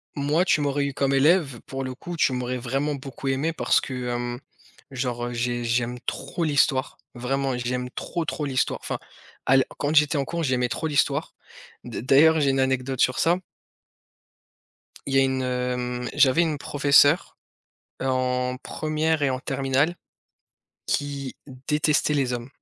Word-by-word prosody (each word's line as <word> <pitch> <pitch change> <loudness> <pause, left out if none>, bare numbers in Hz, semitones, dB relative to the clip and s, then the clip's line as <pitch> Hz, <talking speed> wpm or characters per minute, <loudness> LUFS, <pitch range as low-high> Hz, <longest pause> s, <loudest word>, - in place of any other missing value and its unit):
moi, 150 +4 +2
tu 185 - +2
m'aurais 145 0 0
eu 140 - -4
comme 140 +1 0
élève 140 -3 +3
pour 135 0 -5
le 130 -1 -5
coup, 175 +5 -7
tu 135 - +3
m'aurais 125 0 -2
vraiment 135 +4 -1
beaucoup 135 0 -6
aimé, 140 +5 0
parce - - +2
que, 125 -2 -5
hem, 120 0 -3 0.5
genre, 125 -2 -2
heu, - - -5
j'ai 120 0 -1
j'aime 120 +1 -1
trop 135 +5 -4
l'Histoire, 140 -3 +1 0.2
vraiment, 135 +2 -1
j'aime 125 +1 -2
trop 170 +3 -4
trop 150 0 -3
l'Histoire 130 -2 -1
enfin, - - -3 0.5
à 135 - +4
l 135 - +5
quand 150 +2 -1
j'étais 150 0 +4
en 140 - 0
cours, 170 +4 -3
j'aimais 125 -3 +1
trop 160 - -3
l'Histoire, 145 0 0 0.5
d - - -5
d'ailleurs, 150 +6 +5
j'ai 140 - +3
une 135 - 0
anecdote 130 -1 0
sur 130 - +2
ça. 170 +2 +3 1.7
Il 135 - -1
y 135 - +6
a - - +5
une, 125 -1 -1
mmh, - - -3
j'avais 135 +5 +4
une 155 -3 -1
professeure, 145 +3 +4 0.7
heu, - - -2
en 125 0 0
1re 155 0 -1
et 140 - +3
en 130 0 -2
terminale, 135 +5 0 0.9
qui 140 -2 -2 0.3
détestait 150 0 +2
les 135 -3 +1
hommes, 120 +1 -4
135 Hz, 165 wpm, -25 LUFS, 125-145 Hz, 1.7 s, y